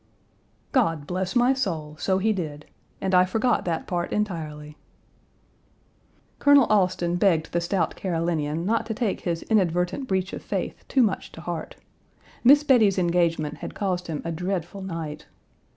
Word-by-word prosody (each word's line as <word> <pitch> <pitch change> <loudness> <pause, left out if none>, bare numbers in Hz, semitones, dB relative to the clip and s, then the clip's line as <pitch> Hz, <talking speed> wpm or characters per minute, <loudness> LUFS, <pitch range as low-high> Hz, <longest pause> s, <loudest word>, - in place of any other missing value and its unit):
"God 165 - +1
bless 185 +2 -3
my 245 +2 +4
soul, 165 - -3
so 190 -1 +1
he 215 +3 +2
did. 150 -6 -5 0.4
And 190 0 -1
I 180 0 +7
forgot 225 +6 +1
that 165 -2 -2
part 175 -1 -2
entirely." 155 -7 -3 1.6
Colonel 285 -2 +6
Alston 180 -4 +2
begged 170 -4 +2
the 170 - 0
stout 170 -1 -1
Carolinian 165 -3 -1
not 225 +2 0
to 220 - -3
take 215 -4 -1
Page 170 -2 -2
235 - - -13
his - - -24
inadvertent 180 +4 +1
breach 190 -2 -1
of - - -5
faith - - -4
too 265 - +3
much 205 -4 -1
to 165 - -10
heart. 170 -2 -5 0.7
Miss 285 +4 +7
Bettie's 225 -9 +4
engagement 170 -4 +1
had - - -7
caused 185 -3 -2
him 155 -3 -4
a 165 - -2
dreadful 180 +2 -3
night. 165 -5 -6
180 Hz, 160 wpm, -25 LUFS, 165-205 Hz, 1.6 s, I